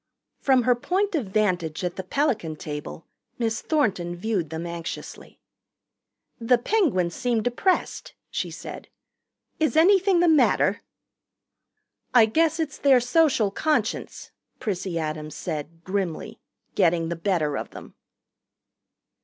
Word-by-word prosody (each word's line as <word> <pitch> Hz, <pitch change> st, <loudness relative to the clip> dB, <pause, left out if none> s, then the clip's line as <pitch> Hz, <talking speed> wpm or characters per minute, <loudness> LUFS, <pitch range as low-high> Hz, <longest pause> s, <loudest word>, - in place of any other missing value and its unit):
From 260 Hz, -3 st, +3 dB
her 250 Hz, -, +4 dB
point 380 Hz, -, -1 dB
of 285 Hz, -, -1 dB
vantage 185 Hz, -6 st, 0 dB
at 180 Hz, -1 st, -2 dB
the -, -, -4 dB
Pelican 210 Hz, -, -1 dB
table 150 Hz, +1 st, -7 dB, 0.3 s
Miss 230 Hz, -1 st, -1 dB
Thornton 190 Hz, -, 0 dB
viewed 185 Hz, -4 st, -2 dB
them 160 Hz, +1 st, -5 dB
anxiously. 170 Hz, -1 st, -7 dB, 1.0 s
"The 240 Hz, +1 st, +3 dB
Penguins 235 Hz, -, +1 dB
seem 235 Hz, 0 st, 0 dB
depressed," 245 Hz, -, -1 dB, 0.2 s
she -, -, -2 dB
said. -, -, -9 dB, 0.7 s
"Is 315 Hz, 0 st, +1 dB
anything 385 Hz, +2 st, +5 dB
the 350 Hz, -, +4 dB
matter?" 315 Hz, -3 st, +3 dB, 1.3 s
"I 235 Hz, -3 st, +8 dB
guess 320 Hz, +8 st, +1 dB
it's 310 Hz, -2 st, -3 dB
their 270 Hz, -3 st, +5 dB
Social 245 Hz, -4 st, +2 dB
Conscience," 310 Hz, +9 st, -2 dB, 0.3 s
Prissy 190 Hz, -6 st, -3 dB
Adams 155 Hz, -1 st, -4 dB
said 155 Hz, +2 st, -6 dB
grimly, 185 Hz, -3 st, -3 dB, 0.3 s
"getting 170 Hz, -3 st, +2 dB
the 170 Hz, -, -2 dB
better 165 Hz, -4 st, 0 dB
of -, -, -4 dB
them." -, -, -11 dB
215 Hz, 120 wpm, -25 LUFS, -, 1.3 s, I